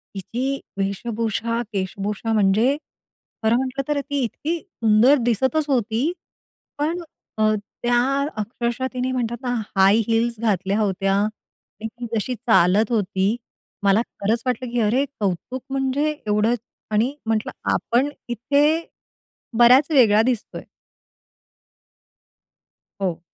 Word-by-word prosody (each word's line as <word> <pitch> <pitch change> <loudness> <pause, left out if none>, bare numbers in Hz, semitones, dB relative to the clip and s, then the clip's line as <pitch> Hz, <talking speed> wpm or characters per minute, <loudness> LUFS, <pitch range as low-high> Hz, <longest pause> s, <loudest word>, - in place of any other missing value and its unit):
हिची 255 +8 -3 0.2
वेशभूषा, 225 +3 -1
केशभूषा 200 +3 -2
म्हणजे 215 +6 +3 0.7
खरं 220 +1 +4
म्हटलं 265 +1 -2
तर 295 -1 0
ती 285 0 -3
इतकी 315 +8 -2
सुंदर 235 - +3
दिसतच 260 +6 +1
होती. 240 +3 +1 0.7
पण 320 +4 -1 0.4
अ, 215 0 +3 0.3
त्या 240 0 +3 0.4
अक्षरशः 235 +4 -2
तिने 255 +1 -1
म्हणतात 240 -2 -2
ना, 245 -1 -1 0.2
हाय 195 +2 +6
हील्स 230 0 +1
घातल्या 200 -2 0
होत्या 195 -1 +1
आणि 215 +1 -5
ती 240 +2 -8
जशी 245 +4 -1
चालत 210 -1 +3
होती, 200 -1 +1 0.5
मला 200 +3 +4
खरंच 225 0 -2
वाटलं, 250 0 -1
की 240 - 0
अरे 245 +6 +2
कौतुक 205 +6 -2
म्हणजे 270 +2 0 0.2
एवढं 210 +2 +2 0.4
आणि 225 +6 +2
म्हंटलं 220 -1 0 0.2
आपण 255 +5 +1 0.2
इथे 280 +5 +2 0.9
बऱ्याच 255 +6 +6
वेगळा 220 -7 +6
दिसतोय. 240 -2 -2 2.4
हो. 180 -4 -1
230 Hz, 115 wpm, -22 LUFS, 210-255 Hz, 2.4 s, हाय